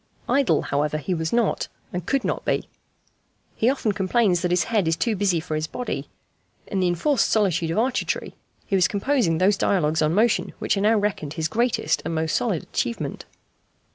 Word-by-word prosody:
Idle, 275 -2 +2
however, 150 +2 0
he 165 +5 -2
was 160 -2 -2
not 235 -2 +1 0.3
and 180 0 -3
could 275 -2 +1
not - - -2
be. - - -1 0.9
He 230 - +2
often 260 -5 0
complains 195 -2 +1
that 180 - 0
his 180 0 +2
head 215 -7 0
is 165 - +2
too 215 +7 0
busy 190 -4 +1
for 160 0 -6
his 155 0 -1
body. 250 +8 -4 0.6
In 195 - -3
the 185 - +2
enforced 225 - +2
solitude 180 -6 +1
of 165 - -2
Arcetri 250 +3 -1 0.3
he 195 - -1
was 185 -2 +4
composing 205 - +1
those 195 +4 +3
dialogues 160 -6 +1
on 155 +2 +2
motion 225 +2 +2
which - - 0
are 195 - -1
now 220 +2 +4
reckoned 200 -8 -2
his 160 -1 -1
greatest 225 -7 0
and 165 0 -3
most 160 0 0
solid 220 -10 0
achievement. 115 0 -3
190 Hz, 190 wpm, -24 LUFS, 160-225 Hz, 0.9 s, was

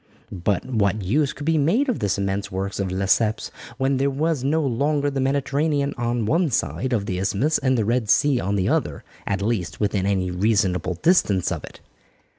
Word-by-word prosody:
But 95 +1 -1
what 105 -5 0
use 135 +9 +1
could 145 - -8
be 165 -1 +2
made 210 - +2
of 250 - -1
this 100 -1 0
immense 100 0 -2
work 95 +2 -3
of 95 -2 -2
Lesseps 100 +4 +1 0.3
when 135 +1 +1
there 140 +1 +1
was 150 0 -1
no 155 +4 +1
longer 145 +3 0
the 135 -1 -2
Mediterranean 140 +1 0
on 120 -2 -1
one 165 - +2
side 130 0 -1
of 110 -5 0
the 90 -2 -3
isthmus 105 +11 +1
and 130 -1 +1
the 110 - +1
Red 115 -1 0
Sea 140 +1 +3
on 100 0 -1
the 95 -2 0
other, - - -1 0.2
at 100 -1 -1
least, 95 -10 -2
within 100 -2 0
any 95 -2 0
reasonable 95 -2 +1
distance 105 - +3
of - - -4
it? - - -12
115 Hz, 195 wpm, -23 LUFS, 100-140 Hz, 0.3 s, Sea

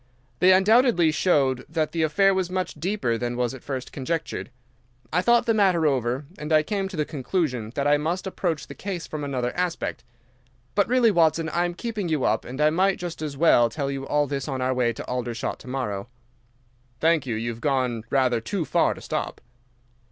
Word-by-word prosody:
They 185 - +6
undoubtedly 195 -2 +5
showed 135 -7 +2
that 155 -1 -1
the 165 - -1
affair 195 +6 +3
was 190 -2 -1
much 185 -1 -2
deeper 155 - -1
than 120 0 -3
was 125 -1 0
at 130 - -9
first 130 -2 -5
conjectured. 160 +3 -3 0.6
I 180 - +3
thought 235 +5 +4
the 230 - +3
matter 190 -6 +3
over, 130 -1 0
and 150 +1 -5
I 155 -1 +5
came 195 +3 -2
to 190 -3 -8
the 150 - +1
conclusion 135 - -2
that 140 - -1
I 145 0 +4
must 165 +6 -2
approach 175 -5 -2
the - - -9
case 185 -4 -5
from 155 -1 -5
another 130 -3 -2
aspect. 175 -7 -2 0.7
But 200 -1 +2
really, 240 -1 +4
Watson, 165 -3 +2
I 175 +3 +1
am 175 0 -3
keeping 215 -4 -3
you 155 -5 0
up, - - +1
and 130 +3 -7
I 150 0 +4
might 190 +4 +2
just 175 -3 -6
as 150 -3 -4
well 120 -7 +5
tell 140 +2 -3
you 135 0 -5
all 150 0 +2
this 140 -1 -4
on 135 -2 -3
our 130 0 +1
way 125 -2 +1
to 115 - -7
Aldershot 120 -2 -3
to - - -14
morrow." 120 -6 -3 0.9
"Thank 160 -3 +2
you, 115 - -1
you 115 +2 -2
have 115 0 -10
gone 125 -5 0
rather 130 -4 +2
too 175 - -2
far - - +2
to - - -11
stop." - - -3
155 Hz, 205 wpm, -25 LUFS, 130-180 Hz, 0.9 s, They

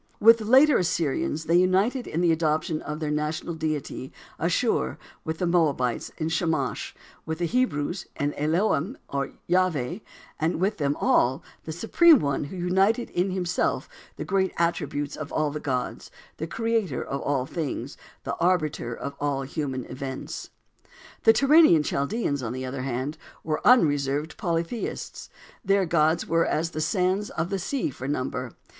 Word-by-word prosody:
With 230 +2 +7
the 215 - -5
later 265 +5 +6
Assyrians, 160 -3 -1
they 165 +2 +3
united 195 +8 +2
in 165 - -2
the 175 -2 +4
adoption 155 -1 0
of 150 0 -5
their 155 -2 -2
national 150 +3 -2
deity, 155 -4 -3 0.3
Asshur; 65 0 +1 0.3
with 160 0 -3
the 180 - -1
Moabites, 150 -9 +1
in 155 - -2
Chemosh; 160 0 -1 0.3
with 160 0 -4
the 175 - -1
Hebrews, 180 - -1
in 145 +1 0
Elohim, 170 - 0
or 140 0 -2
Yahveh; 180 - +1 0.4
and 160 +1 0
with 195 +4 0
them 145 -1 +1
all, 130 +3 +2 0.2
the 160 - -4
Supreme 295 - +5
One 140 - -1
who 170 +6 -8
united 190 +7 +1
in 180 +2 0
Himself 180 -2 -1 0.3
the - - -5
great 190 -1 +1
attributes 150 -4 -1
of 155 0 -7
all 155 -1 0
the 150 - -4
gods, 130 -4 -3 0.3
the 160 - -4
Creator 225 - -1
of 140 - -4
all 135 -3 0
things, 140 -3 -4 0.3
the - - -3
Arbiter 155 -9 0
of 140 - -5
all 140 -2 -1
human 135 -2 -3
events. 130 +1 -6 0.8
The - - +9
Turanian 275 - +6
Chaldeans, 140 - -1
on 120 -1 -3
the 130 0 -4
other 130 +1 -4
hand, 135 +4 -3 0.2
were 155 -1 -2
unreserved 145 - +3
polytheists. 170 +3 -3 0.3
Their 195 0 +3
gods 160 0 +2
were 165 0 +2
as 165 +2 0
the 155 - -3
sands 185 +4 +1
of 165 +4 -3
the 195 - -1
sea 240 - -2
for 130 +1 -7
number. 130 -3 -3
160 Hz, 160 wpm, -26 LUFS, 145-185 Hz, 0.8 s, The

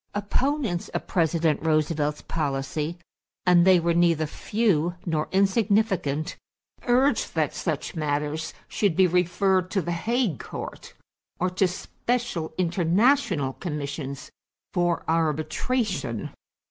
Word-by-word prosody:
Opponents 220 - -1
of - - -4
President 165 -3 +1
Roosevelt's 155 -1 +1
policy, 150 +2 -2 0.5
and 180 0 +5
they 185 -2 +7
were 170 0 +1
neither 165 -2 +3
few 175 -1 0
nor 155 -3 -1
insignificant, 195 - +1 0.5
urged 260 +4 +2
that - - +1
such - - -3
matters 150 +1 -2 0.2
should 200 -6 0
be 190 - +5
referred 180 +1 +2
to 195 - 0
the 175 -1 -2
Hague 220 - 0
Court - - -8 0.4
or 180 +1 0
to 185 +1 +2
special 190 -1 -3
international 180 - +2
commissions 140 -4 -5 0.4
for 175 -2 +1
arbitration. 160 - -1
175 Hz, 110 wpm, -25 LUFS, 155-195 Hz, 0.5 s, they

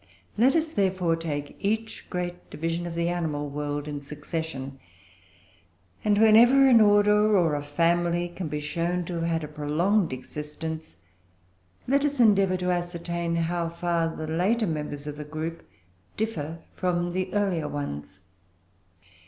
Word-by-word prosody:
Let 250 +7 +4
us, 320 -1 +1
therefore, 185 - +1
take 150 -3 -4
each 220 +2 -2
great 180 0 -4
division 165 +2 -3
of 170 - -6
the 170 0 0
animal 155 -4 -2
world 145 0 -3
in 145 -1 -4
succession, 145 -2 -5 1.2
and, 205 -1 +3
whenever 235 +5 +7
an 240 -4 +7
order 210 0 +5
or 165 -4 +3
a 145 - -1
family 170 +3 +1
can 175 0 -6
be 150 0 -3
shown 170 +4 -1
to 180 - -5
have - - -2
had 165 -1 0
a - - -4
prolonged 155 +6 +1
existence, 150 +4 -6 0.9
let 280 +2 +3
us 285 -2 -1
endeavour 195 -5 +4
to 180 0 0
ascertain 170 -1 -2
how 170 0 0
far 170 -1 -1
the 155 - -5
later 185 +9 +1
members 150 -4 -4
of 150 -1 -6
the 150 - -5
group 160 +2 -5 0.6
differ 165 -7 -3
from 175 -1 -1
the 185 0 -2
earlier 185 -7 +1
ones. 95 - -5
170 Hz, 145 wpm, -26 LUFS, 150-190 Hz, 1.2 s, whenever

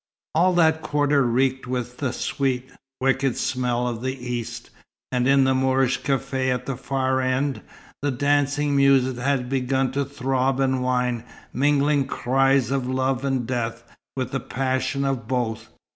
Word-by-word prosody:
All 180 +3 +3
that 160 -2 +3
quarter 145 -1 +2
reeked 130 +2 +1
with 125 -1 -3
the 130 -4 -1
sweet, 130 0 -2 0.3
wicked 135 -1 +1
smell 125 -1 0
of 115 -2 -3
the 130 +1 -2
East; 125 -2 -5 0.4
and 125 0 +1
in 135 0 +5
the 130 0 +3
Moorish 130 0 +1
café 130 -1 0
at 125 0 -2
the 135 - -3
far 130 0 -1
end, 130 +2 0 0.4
the 145 - 0
dancing 145 +2 +1
music 135 -2 +4
had 130 0 0
begun 130 0 0
to 140 +1 0
throb 135 -1 -1
and 130 -1 +1
whine, 125 -2 0 0.3
mingling 145 +1 +2
cries 135 0 +2
of 135 -2 -1
love 130 0 0
and 135 -3 0
death, 120 -1 -3 0.3
with 130 -1 -3
the 135 - -1
passion 130 +2 -1
of 130 -5 -2
both. 120 -3 -2
130 Hz, 155 wpm, -23 LUFS, 125-135 Hz, 0.4 s, in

